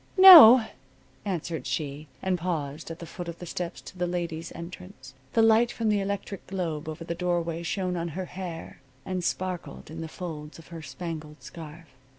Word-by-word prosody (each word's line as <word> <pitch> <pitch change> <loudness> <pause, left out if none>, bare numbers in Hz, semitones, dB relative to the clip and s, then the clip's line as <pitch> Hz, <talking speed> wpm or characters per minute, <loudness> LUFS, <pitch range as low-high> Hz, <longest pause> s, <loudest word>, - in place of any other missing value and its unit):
"No," 305 -12 +11 0.6
answered 170 -4 -3
she, 150 0 -4 0.2
and 190 -1 +1
paused 160 -3 -4
at 165 - -6
the 170 - -9
foot 175 +1 -8
of 170 0 -6
the 175 - -9
steps 175 0 -5
to - - -12
the 180 -1 -1
ladies' 170 -2 -4
entrance. 170 -5 -10 0.2
The 225 - +4
light 225 +2 +4
from 225 -2 -1
the 210 -1 +2
electric 200 0 -5
globe 165 -5 -3
over 155 +2 -7
the 170 - -4
doorway 170 -1 -1
shone 180 +1 -2
on 170 0 -2
her 190 - -3
hair 175 -5 -8 0.2
and 185 -1 -3
sparkled 180 -4 -4
in 165 +1 -7
the 165 - -5
folds 155 -3 -8
of 165 - -15
her 165 -1 -8
spangled 155 +2 -7
scarf. 165 0 -10
170 Hz, 180 wpm, -27 LUFS, 160-185 Hz, 0.6 s, No